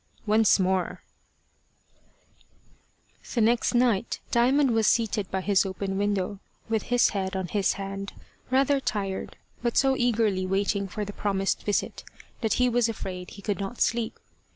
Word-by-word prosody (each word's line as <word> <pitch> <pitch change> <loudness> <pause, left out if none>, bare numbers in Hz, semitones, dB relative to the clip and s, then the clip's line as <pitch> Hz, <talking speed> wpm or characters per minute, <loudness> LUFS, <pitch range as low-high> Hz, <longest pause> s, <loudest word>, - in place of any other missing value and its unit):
ONCE 215 -1 +4
MORE 185 -1 0 2.3
THE - - +2
next 235 +3 +2
night 235 -3 +2
Diamond 260 +3 +3
was 225 -1 +2
seated 220 -3 +1
by 190 - -2
his 200 +1 +3
open 195 0 -4
window, 200 -1 -1 0.3
with 225 -1 0
his 245 +2 +3
head 190 -1 -3
on 190 -2 -3
his 200 -3 +1
hand, 195 0 -6 0.4
rather 275 +2 +3
tired, 195 -7 -3 0.2
but 235 -1 -1
so 270 -1 +4
eagerly 220 -6 +1
waiting 200 +1 0
for 210 +2 -4
the 205 - -7
promised 195 -2 -1
visit 205 - -2 0.4
that 220 -2 +1
he 250 - +3
was 240 -1 +2
afraid 180 -4 -6
he 200 - -12
could 205 -2 -2
not 200 +5 -5
sleep. 230 -1 0
205 Hz, 150 wpm, -26 LUFS, 195-235 Hz, 2.3 s, ONCE